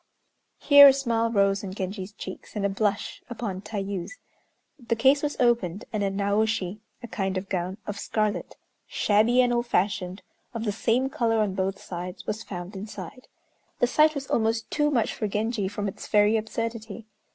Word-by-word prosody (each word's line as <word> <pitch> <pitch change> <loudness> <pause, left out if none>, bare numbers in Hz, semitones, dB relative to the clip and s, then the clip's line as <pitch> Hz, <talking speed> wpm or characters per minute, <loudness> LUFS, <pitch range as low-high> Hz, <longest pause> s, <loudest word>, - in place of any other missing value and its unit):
Here 285 -1 +9
a 275 - +8
smile 230 -4 0
rose 200 -2 +2
on 190 -1 -6
Genji's 190 0 -4
cheeks, 190 0 -9
and 205 -1 -1
a - - +2
blush 200 +1 -1
upon 215 -6 -4
Tayû's. 200 - -5 0.6
The 235 -2 -1
case 265 +5 +4
was 295 -1 -2
opened, 225 -6 +1
and 215 - -1
a 200 - +1
Naoshi 200 0 0 0.2
(a - - -5
kind 195 -4 -2
of 190 +1 -5
gown), 185 +1 -2
of 205 -1 -5
scarlet, 215 -1 -2 0.3
shabby 220 +4 +3
and 245 -1 +1
old 240 0 0
fashioned, 185 -2 -1 0.3
of 225 - -3
the 215 - 0
same 235 +5 +1
color 230 -3 +1
on 210 -3 +1
both 190 +1 -2
sides, 180 +1 -7
was 215 +1 -3
found 180 +1 -7
inside. 205 +4 -8 0.5
The - - +3
sight 305 +5 +4
was 280 -1 -4
almost 225 -2 0
too 295 0 +2
much 245 -6 +1
for 215 - -2
Genji 210 0 -1
from 205 +1 -3
its 195 - -7
very 210 +1 +4
absurdity. 225 0 -4
210 Hz, 175 wpm, -26 LUFS, 195-235 Hz, 0.6 s, Here